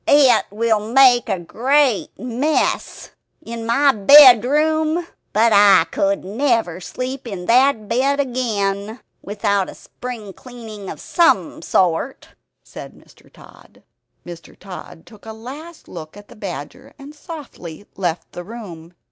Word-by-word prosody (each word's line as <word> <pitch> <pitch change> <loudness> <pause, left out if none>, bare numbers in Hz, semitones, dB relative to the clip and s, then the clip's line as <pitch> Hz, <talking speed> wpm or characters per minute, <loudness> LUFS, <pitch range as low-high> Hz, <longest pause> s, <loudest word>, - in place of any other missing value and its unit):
"It 285 -3 +4
will 220 0 -1
make 250 -2 +5
a - - 0
great 250 - 0
mess 255 +5 -2 0.3
in 230 0 -7
my 275 +5 +3
bedroom; 295 - +5 0.3
but 225 +2 +3
I 200 -4 +6
could 195 -1 -1
never 220 - -1
sleep 255 +7 -6
in 190 -5 -7
that 245 -1 +2
bed 270 +5 0
again 220 -5 -2 0.2
without 200 -1 -1
a - - -11
spring 230 -6 -9
cleaning 225 -5 -11
of - - -8
some 340 - +1
sort," 180 +8 -1 0.3
said - - -11
Mr. - - -22
Tod. - - -19 0.4
Mr. 170 -1 -12
Tod 185 -3 -11
took 215 -1 -17
a 220 - -7
last 285 +9 -11
look 160 +1 -10
at 205 - -15
the - - -14
badger 175 -9 -9
and 285 +1 -12
softly 285 - -10
left 175 -3 -4
the 175 - -8
room. 175 -6 -11
230 Hz, 130 wpm, -19 LUFS, 195-265 Hz, 0.4 s, I